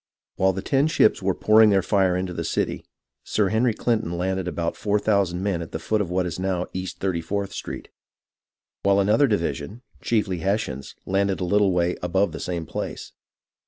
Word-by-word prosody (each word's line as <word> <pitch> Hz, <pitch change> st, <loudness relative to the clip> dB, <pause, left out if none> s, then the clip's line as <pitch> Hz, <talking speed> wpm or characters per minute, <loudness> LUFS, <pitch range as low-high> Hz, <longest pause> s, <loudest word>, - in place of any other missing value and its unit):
While 95 Hz, 0 st, +2 dB
the 95 Hz, +1 st, -5 dB
ten 140 Hz, +5 st, +2 dB
ships 155 Hz, -10 st, +3 dB
were 95 Hz, -1 st, 0 dB
pouring 110 Hz, 0 st, +5 dB
their 95 Hz, -2 st, +3 dB
fire 95 Hz, -3 st, +2 dB
into 90 Hz, -1 st, -3 dB
the -, -, -3 dB
city. -, -, -2 dB, 0.4 s
Sir 105 Hz, -3 st, +1 dB
Henry 110 Hz, +1 st, +2 dB
Clinton 110 Hz, -8 st, -1 dB
landed 95 Hz, 0 st, -1 dB
about 85 Hz, -1 st, -2 dB
four 105 Hz, 0 st, 0 dB
thousand 100 Hz, -4 st, +1 dB
men 95 Hz, -4 st, 0 dB
at 85 Hz, -, -8 dB
the -, -, -1 dB
foot 105 Hz, +6 st, 0 dB
of 95 Hz, -, -3 dB
what 90 Hz, 0 st, 0 dB
is 90 Hz, 0 st, -4 dB
now 95 Hz, -1 st, -1 dB
East 95 Hz, 0 st, -5 dB
34th 95 Hz, +2 st, -2 dB
Street, -, -, -6 dB, 0.9 s
while 100 Hz, 0 st, +3 dB
another 105 Hz, +8 st, +4 dB
divi 100 Hz, -8 st, +1 dB
sion, 105 Hz, -, -9 dB, 0.2 s
chiefly 105 Hz, -6 st, 0 dB
Hessians, 90 Hz, -8 st, -2 dB
landed 95 Hz, 0 st, 0 dB
a 90 Hz, -, -1 dB
little 100 Hz, +1 st, +3 dB
way 90 Hz, 0 st, +1 dB
above 95 Hz, +3 st, +1 dB
the -, -, -7 dB
same 85 Hz, -2 st, -3 dB
place. -, -, -5 dB
95 Hz, 190 wpm, -24 LUFS, 90-105 Hz, 0.9 s, pouring